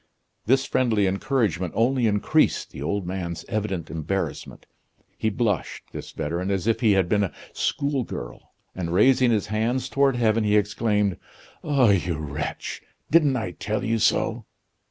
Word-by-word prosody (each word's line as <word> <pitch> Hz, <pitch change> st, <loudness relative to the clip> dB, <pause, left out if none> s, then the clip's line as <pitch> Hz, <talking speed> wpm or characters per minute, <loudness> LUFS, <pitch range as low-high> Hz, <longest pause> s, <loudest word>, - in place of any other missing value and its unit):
This 135 Hz, +3 st, +3 dB
friendly 110 Hz, -5 st, +2 dB
encouragement 95 Hz, -, 0 dB
only 120 Hz, +1 st, +2 dB
increased 105 Hz, -1 st, +2 dB
the -, -, -9 dB
old 100 Hz, +6 st, -2 dB
man's 90 Hz, -2 st, -4 dB
evident 100 Hz, -6 st, -3 dB
embarrassment. 90 Hz, +5 st, -4 dB, 0.5 s
He 110 Hz, -, 0 dB
blushed, 105 Hz, -3 st, -1 dB
this -, -, -7 dB
veteran, 85 Hz, +5 st, -3 dB
as 95 Hz, -2 st, -1 dB
if 115 Hz, 0 st, +1 dB
he 110 Hz, -4 st, +4 dB
had 95 Hz, -2 st, +2 dB
been 105 Hz, +2 st, +2 dB
a 95 Hz, -, -6 dB, 0.2 s
schoolgirl, 130 Hz, -, -3 dB, 0.2 s
and 85 Hz, -3 st, -4 dB
raising 125 Hz, +4 st, +5 dB
his 110 Hz, -3 st, +1 dB
hands 115 Hz, +4 st, 0 dB
toward 140 Hz, -2 st, +2 dB
heaven, 115 Hz, -2 st, +2 dB
he 105 Hz, 0 st, +3 dB
exclaimed: 105 Hz, -2 st, +1 dB, 0.5 s
"Ah, 135 Hz, -7 st, +4 dB
you 90 Hz, -4 st, 0 dB
wretch! 75 Hz, 0 st, -5 dB, 0.3 s
didn't 150 Hz, -4 st, +4 dB
I 110 Hz, -8 st, -2 dB
tell 105 Hz, +6 st, -3 dB
you 115 Hz, 0 st, +1 dB
so?" -, -, +1 dB
105 Hz, 150 wpm, -24 LUFS, 95-120 Hz, 0.5 s, raising